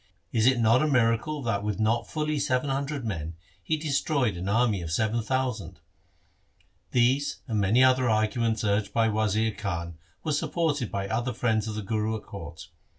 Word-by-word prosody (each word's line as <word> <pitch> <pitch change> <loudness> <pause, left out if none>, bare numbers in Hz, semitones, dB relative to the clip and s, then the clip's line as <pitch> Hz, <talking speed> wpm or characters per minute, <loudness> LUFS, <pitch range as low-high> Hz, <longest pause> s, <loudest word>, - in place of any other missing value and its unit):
Is 115 0 +3
it 130 -2 +4
not 115 +3 +4
a 155 - +2
miracle 130 +3 +1
that 110 -4 0
with 105 0 -2
not 115 +2 +1
fully 155 -1 -1
seven 130 +1 0
hundred 140 -1 -2
men 80 -6 -4 0.3
he 125 - -1
destroyed 140 - 0
an 90 +3 -4
army 110 -3 +2
of 80 -2 -5
seven 110 +6 +1
thousand? 125 -2 -2 0.6
' - - -40
These 130 +4 +2
and 110 -4 0
many 105 +6 +4
other 130 0 +4
argu 110 -1 +1
ments 115 0 0
urged 100 -1 0
by 115 -1 +3
Wazir 110 +1 +1
Khan 85 -5 -5 0.2
were 155 - -1
supported 150 -4 0
by 100 0 -2
other 120 +4 -1
friends 110 -2 0
of 110 - -4
the 105 - -4
Guru 110 +2 -1
at - - -11
court. 85 -5 -9
115 Hz, 185 wpm, -27 LUFS, 105-130 Hz, 0.6 s, it